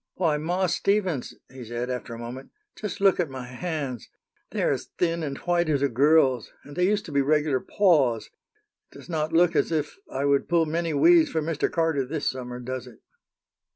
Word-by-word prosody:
"Why, 160 Hz, -5 st, +1 dB
Ma 175 Hz, +5 st, 0 dB
Stevens!" 185 Hz, -5 st, 0 dB, 0.2 s
he 130 Hz, -1 st, -9 dB
said, 120 Hz, +2 st, -4 dB
after 115 Hz, -2 st, -5 dB
a -, -, -8 dB
moment, 120 Hz, +3 st, -8 dB, 0.3 s
"just 205 Hz, -2 st, -6 dB
look 195 Hz, -2 st, +4 dB
at 170 Hz, -5 st, 0 dB
my 130 Hz, -1 st, -7 dB
hands! 135 Hz, -2 st, -5 dB, 0.4 s
They -, -, -2 dB
are -, -, +3 dB
as -, -, -3 dB
thin 170 Hz, -1 st, 0 dB
and 140 Hz, -3 st, -4 dB
white 175 Hz, -2 st, 0 dB
as 140 Hz, -2 st, +1 dB
a 140 Hz, -, +3 dB
girl's, 130 Hz, -1 st, +3 dB
and 145 Hz, -, -12 dB
they 180 Hz, 0 st, +2 dB
used 210 Hz, +1 st, 0 dB
to 160 Hz, -, -8 dB
be 140 Hz, -1 st, +2 dB
regular 150 Hz, -1 st, +2 dB
paws. 140 Hz, -, +2 dB, 0.6 s
It -, -, -20 dB
does -, -, -14 dB
not 155 Hz, -1 st, -1 dB
look 170 Hz, +1 st, +4 dB
as -, -, +2 dB
if 155 Hz, -, -2 dB
I 140 Hz, -, -1 dB
would 140 Hz, -1 st, +2 dB
pull 170 Hz, -1 st, +3 dB
many 165 Hz, 0 st, -1 dB
weeds 335 Hz, -, +6 dB
for 160 Hz, -, -1 dB
Mr. 160 Hz, -1 st, -1 dB
Carter 165 Hz, -5 st, +1 dB
this 145 Hz, +3 st, -3 dB
summer, 125 Hz, -1 st, -4 dB
does 130 Hz, 0 st, -5 dB
it?" 120 Hz, -3 st, -15 dB
150 Hz, 205 wpm, -26 LUFS, 130-170 Hz, 0.6 s, weeds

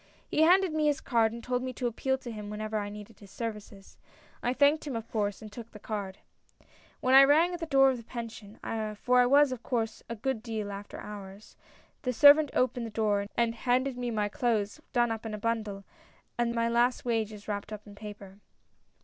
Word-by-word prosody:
" -, -, -33 dB
He -, -, +2 dB
handed 360 Hz, +1 st, +5 dB
me 310 Hz, -1 st, +1 dB
his 295 Hz, 0 st, +1 dB
card 230 Hz, -6 st, +2 dB
and 235 Hz, 0 st, -8 dB
told 250 Hz, 0 st, -1 dB
me 255 Hz, 0 st, -4 dB
to 250 Hz, -, -4 dB
appeal 265 Hz, +3 st, 0 dB
to 245 Hz, -2 st, -8 dB
him 210 Hz, -2 st, -7 dB
whenever 215 Hz, +1 st, -3 dB
I 205 Hz, 0 st, -4 dB
needed 210 Hz, +1 st, -11 dB
his 200 Hz, -, -14 dB
services. 210 Hz, -3 st, -7 dB, 0.4 s
I 245 Hz, -, 0 dB
thanked 290 Hz, +3 st, +3 dB
him 270 Hz, -, -3 dB
of 225 Hz, 0 st, -5 dB
course, 205 Hz, -1 st, -2 dB
and 215 Hz, -, -9 dB
took 230 Hz, +1 st, -9 dB
the 215 Hz, -, -12 dB
card. 205 Hz, -2 st, -5 dB, 0.4 s
" -, -, -29 dB
When 255 Hz, -, +2 dB
I 270 Hz, +1 st, +10 dB
rang 315 Hz, +6 st, +4 dB
at 350 Hz, -, -4 dB
the 330 Hz, -, -4 dB
door 270 Hz, -2 st, +5 dB
of 255 Hz, -, -3 dB
the 230 Hz, -, -10 dB
Pension, 225 Hz, -3 st, -8 dB, 0.4 s
for 250 Hz, +4 st, +3 dB
I 245 Hz, -, +4 dB
was 285 Hz, +1 st, +5 dB
of 255 Hz, -2 st, -5 dB
course 225 Hz, -3 st, -2 dB
a 230 Hz, -, -3 dB
good 235 Hz, +1 st, -2 dB
deal 220 Hz, -3 st, -4 dB
after 200 Hz, +1 st, -8 dB
hours, 205 Hz, 0 st, -10 dB, 0.5 s
the 250 Hz, -2 st, -1 dB
servant 290 Hz, +4 st, +7 dB
opened 250 Hz, -2 st, +1 dB
the -, -, -7 dB
door 210 Hz, -2 st, 0 dB
and 235 Hz, -1 st, +2 dB
handed 250 Hz, +3 st, 0 dB
me 245 Hz, 0 st, -3 dB
my 210 Hz, -2 st, 0 dB
clothes 230 Hz, +1 st, -1 dB
done 240 Hz, -2 st, +2 dB
up 225 Hz, -1 st, -4 dB
in 220 Hz, -2 st, -4 dB
a -, -, -5 dB
bundle, 215 Hz, -3 st, -2 dB, 0.5 s
and 240 Hz, 0 st, 0 dB
my 230 Hz, 0 st, +1 dB
last 240 Hz, +2 st, +1 dB
wages 220 Hz, -3 st, -2 dB
wrapped 205 Hz, 0 st, -4 dB
in 215 Hz, -, -5 dB
a 205 Hz, -, -12 dB
paper. 205 Hz, -2 st, -10 dB
230 Hz, 220 wpm, -29 LUFS, 210-255 Hz, 0.5 s, I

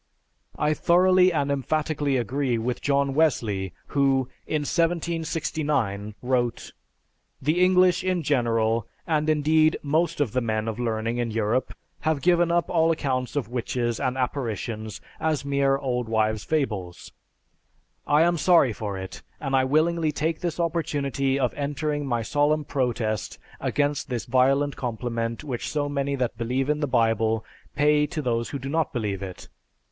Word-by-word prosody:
I 150 Hz, -, +2 dB
thoroughly 185 Hz, +3 st, +4 dB
and 145 Hz, -4 st, 0 dB
emphatically 145 Hz, 0 st, 0 dB
agree 125 Hz, +1 st, 0 dB
with 120 Hz, +2 st, -2 dB
John 140 Hz, -1 st, +1 dB
Wesley 110 Hz, -, +1 dB, 0.2 s
who, 135 Hz, -2 st, +2 dB, 0.2 s
in 155 Hz, -, 0 dB
1769, 155 Hz, -, -1 dB
wrote, 125 Hz, -2 st, -1 dB, 0.7 s
"The 155 Hz, +6 st, +2 dB
English 180 Hz, 0 st, +4 dB
in 185 Hz, -2 st, 0 dB
general, 115 Hz, -5 st, +1 dB, 0.2 s
and 155 Hz, -2 st, 0 dB
indeed 155 Hz, +1 st, +3 dB
most 160 Hz, +3 st, 0 dB
of 140 Hz, -7 st, +1 dB
the 125 Hz, -, 0 dB
men 110 Hz, -1 st, -1 dB
of 110 Hz, +1 st, -3 dB
learning 115 Hz, 0 st, -1 dB
in 120 Hz, -1 st, -1 dB
Europe, 115 Hz, +3 st, -1 dB, 0.2 s
have 155 Hz, -3 st, -1 dB
given 175 Hz, -1 st, +3 dB
up 170 Hz, 0 st, +2 dB
all 165 Hz, -1 st, +2 dB
accounts 135 Hz, -6 st, -1 dB
of 140 Hz, -5 st, -2 dB
witches 120 Hz, -1 st, -2 dB
and 130 Hz, -1 st, -1 dB
apparitions 115 Hz, -5 st, -3 dB, 0.2 s
as 155 Hz, -3 st, -1 dB
mere 140 Hz, -1 st, +2 dB
old 125 Hz, -4 st, -2 dB
wives' 110 Hz, -1 st, +1 dB
fables. 105 Hz, -, -2 dB, 1.0 s
I 150 Hz, +2 st, +5 dB
am 175 Hz, 0 st, +2 dB
sorry 165 Hz, -8 st, +4 dB
for 100 Hz, -2 st, -4 dB
it, 95 Hz, 0 st, -7 dB, 0.2 s
and 135 Hz, -2 st, -1 dB
I 130 Hz, 0 st, +3 dB
willingly 155 Hz, +3 st, +2 dB
take 155 Hz, +2 st, -1 dB
this 175 Hz, -1 st, -3 dB
opportunity 140 Hz, -5 st, 0 dB
of 125 Hz, -4 st, +1 dB
entering 145 Hz, 0 st, -2 dB
my 120 Hz, -3 st, 0 dB
solemn 145 Hz, +4 st, +1 dB
protest 115 Hz, -7 st, -2 dB, 0.2 s
against 145 Hz, -1 st, -1 dB
this 120 Hz, -3 st, -3 dB
violent 135 Hz, +3 st, +2 dB
compliment 115 Hz, -2 st, -3 dB
which 130 Hz, -5 st, -4 dB
so 145 Hz, -1 st, -1 dB
many 140 Hz, -1 st, -1 dB
that 125 Hz, -3 st, -2 dB
believe 130 Hz, +4 st, 0 dB
in 150 Hz, -, -1 dB
the 145 Hz, -, 0 dB
Bible 115 Hz, -2 st, +1 dB, 0.3 s
pay 150 Hz, +1 st, +3 dB
to 150 Hz, +1 st, -4 dB
those 115 Hz, -2 st, -1 dB
who 140 Hz, -, -4 dB
do 135 Hz, 0 st, -7 dB
not 160 Hz, +3 st, 0 dB
believe 105 Hz, -6 st, -2 dB
it. 95 Hz, -2 st, -8 dB
140 Hz, 150 wpm, -25 LUFS, 115-155 Hz, 1.0 s, I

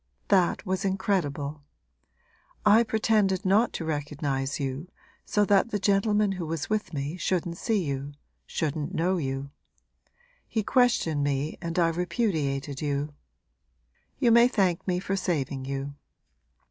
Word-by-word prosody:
That 190 Hz, +1 st, +3 dB
was 190 Hz, +1 st, -1 dB
incredible. 165 Hz, -7 st, -1 dB, 1.0 s
I 215 Hz, +2 st, +7 dB
pretended 215 Hz, -4 st, +1 dB
not 210 Hz, +5 st, +4 dB
to 165 Hz, -, -4 dB
recognise 145 Hz, -3 st, -2 dB
you, 140 Hz, +4 st, -3 dB, 0.4 s
so 210 Hz, 0 st, +2 dB
that 200 Hz, +2 st, +3 dB
the 210 Hz, -, -1 dB
gentleman 205 Hz, +1 st, +2 dB
who 180 Hz, -4 st, -4 dB
was 160 Hz, +3 st, -3 dB
with 215 Hz, -1 st, -1 dB
me 145 Hz, +2 st, -3 dB
shouldn't 175 Hz, -1 st, -1 dB
see 220 Hz, -5 st, +1 dB
you, 140 Hz, -1 st, -4 dB, 0.3 s
shouldn't 155 Hz, -1 st, -2 dB
know 180 Hz, +3 st, +1 dB
you. 135 Hz, -2 st, -3 dB, 1.0 s
He 220 Hz, -, -1 dB
questioned 200 Hz, -, +2 dB
me 140 Hz, +2 st, -1 dB
and 170 Hz, -1 st, -4 dB
I 170 Hz, -2 st, +4 dB
repudiated 160 Hz, -, -1 dB
you. 145 Hz, 0 st, -2 dB, 1.0 s
You 235 Hz, -, +3 dB
may 235 Hz, +1 st, +7 dB
thank 190 Hz, -8 st, 0 dB
me 180 Hz, -1 st, +1 dB
for 195 Hz, +1 st, -2 dB
saving 140 Hz, -8 st, -2 dB
you! 135 Hz, +1 st, -4 dB
170 Hz, 135 wpm, -27 LUFS, 145-200 Hz, 1.0 s, I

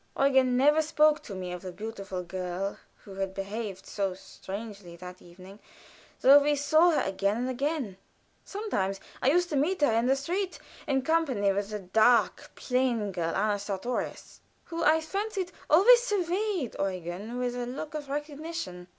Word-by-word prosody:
Eugen 265 Hz, -2 st, +4 dB
never 295 Hz, +4 st, +5 dB
spoke 305 Hz, -1 st, +3 dB
to 200 Hz, -, -8 dB
me 180 Hz, -1 st, -5 dB
of 180 Hz, -1 st, -6 dB
the 185 Hz, -, -6 dB
beautiful 195 Hz, -2 st, -6 dB
girl 185 Hz, +2 st, -4 dB, 0.2 s
who 195 Hz, -, -11 dB
had 190 Hz, 0 st, -4 dB
behaved 195 Hz, -1 st, -5 dB
so 195 Hz, -3 st, -2 dB
strangely 195 Hz, -1 st, -9 dB
that 180 Hz, +1 st, -10 dB
evening, 185 Hz, +3 st, -14 dB, 0.6 s
though 275 Hz, +2 st, +9 dB
we 290 Hz, +1 st, +2 dB
saw 310 Hz, +4 st, +4 dB
her 320 Hz, -, +2 dB
again 200 Hz, +2 st, 0 dB
and 250 Hz, +2 st, -2 dB
again. 265 Hz, -, -2 dB, 0.5 s
Sometimes 200 Hz, -, -2 dB, 0.2 s
I 260 Hz, -, +3 dB
used 350 Hz, +4 st, +2 dB
to 300 Hz, -, -2 dB
meet 315 Hz, +6 st, +1 dB
her 290 Hz, -, +4 dB
in 230 Hz, +2 st, +2 dB
the 265 Hz, -, +4 dB
street, 355 Hz, +8 st, -2 dB, 0.3 s
in 270 Hz, -2 st, +1 dB
company 270 Hz, -10 st, +2 dB
with 200 Hz, +1 st, -2 dB
the 210 Hz, -, -3 dB
dark, 220 Hz, +5 st, +2 dB
plain 250 Hz, -5 st, 0 dB
girl, 170 Hz, -3 st, -2 dB
Anna 205 Hz, 0 st, +1 dB
Sartorius, 205 Hz, +5 st, -4 dB, 0.2 s
who, 335 Hz, -1 st, -4 dB
I 315 Hz, +1 st, +4 dB
fancied, 390 Hz, +2 st, -3 dB, 0.2 s
always 460 Hz, +10 st, +7 dB
surveyed 390 Hz, -, -1 dB
Eugen 190 Hz, +4 st, -4 dB
with 250 Hz, -1 st, -2 dB
a 245 Hz, -1 st, -3 dB
look 280 Hz, +5 st, -6 dB
of 295 Hz, -2 st, -6 dB
recognition. 295 Hz, -, -5 dB
245 Hz, 165 wpm, -28 LUFS, 195-305 Hz, 0.6 s, though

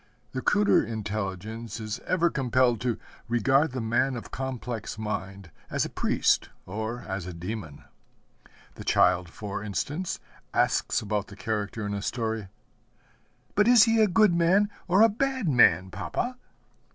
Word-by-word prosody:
The 130 Hz, -, -3 dB
cruder 205 Hz, +7 st, +4 dB
intelligence 110 Hz, +1 st, -4 dB
is 110 Hz, -1 st, -4 dB
ever 175 Hz, -2 st, +2 dB
compelled 125 Hz, -3 st, +2 dB
to 120 Hz, -3 st, 0 dB, 0.3 s
regard 135 Hz, +6 st, +3 dB
the 130 Hz, -, -4 dB
man 120 Hz, +4 st, +1 dB
of 120 Hz, -, -8 dB
complex 125 Hz, -4 st, -4 dB
mind 100 Hz, -4 st, -5 dB, 0.2 s
as -, -, 0 dB
a -, -, -7 dB
priest -, -, +1 dB, 0.2 s
or 110 Hz, +5 st, -4 dB
as 95 Hz, -2 st, -4 dB
a 90 Hz, -, -6 dB
demon. 90 Hz, -4 st, -6 dB, 0.9 s
The -, -, -9 dB
child, 90 Hz, -1 st, +3 dB
for 100 Hz, +2 st, -6 dB
instance, 145 Hz, -, -3 dB, 0.4 s
asks -, -, +1 dB
about 105 Hz, -1 st, -2 dB
the 100 Hz, -, -11 dB
character 105 Hz, +2 st, -3 dB
in 100 Hz, -, -3 dB
a 100 Hz, -, -3 dB
story, 110 Hz, -2 st, -2 dB, 1.1 s
'But 210 Hz, +1 st, +3 dB
is 240 Hz, -3 st, +8 dB
he 225 Hz, 0 st, +3 dB
a 215 Hz, -, +5 dB
good 205 Hz, 0 st, +4 dB
man 185 Hz, +5 st, +3 dB, 0.2 s
or 190 Hz, +4 st, +5 dB
a -, -, +8 dB
bad 260 Hz, 0 st, -1 dB
man, 95 Hz, -, +4 dB
papa?' 250 Hz, -, -3 dB
115 Hz, 150 wpm, -27 LUFS, 100-160 Hz, 1.1 s, is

